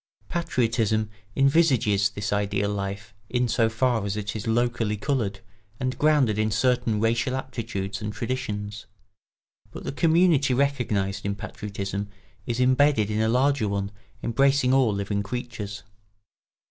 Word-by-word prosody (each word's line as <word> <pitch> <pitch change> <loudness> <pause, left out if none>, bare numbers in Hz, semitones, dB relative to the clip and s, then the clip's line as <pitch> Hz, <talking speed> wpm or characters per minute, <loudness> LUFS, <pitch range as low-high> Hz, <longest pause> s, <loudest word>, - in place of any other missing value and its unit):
Patriotism 115 -10 0 0.2
envisages 135 -9 +3
this 105 0 -3
ideal 100 0 0
life 100 +1 -5 0.2
in 125 0 +1
so 115 0 +2
far 115 -1 +1
as 100 +1 -2
it 105 +1 -4
is 110 +2 -4
locally 115 -2 +1
coloured 105 -5 -1 0.4
and 130 0 -1
grounded 145 -8 +3
in 110 0 +2
certain 115 0 +1
racial 115 +3 +1
aptitudes 110 -7 -4
and 105 0 -3
traditions; 105 -4 -4 0.8
but - - -9
the - - -3
community 160 -3 +3
recognised 110 -8 0
in 100 0 -1
patriotism 100 0 -5 0.4
is 120 0 -2
imbedded 130 -4 +3
in 105 +1 0
a 110 - +2
larger 130 -1 +2
one 100 0 -2 0.3
embracing 135 +2 +3
all 130 -4 +4
living 100 0 -1
creatures. 105 -2 -5
110 Hz, 135 wpm, -25 LUFS, 105-130 Hz, 0.8 s, all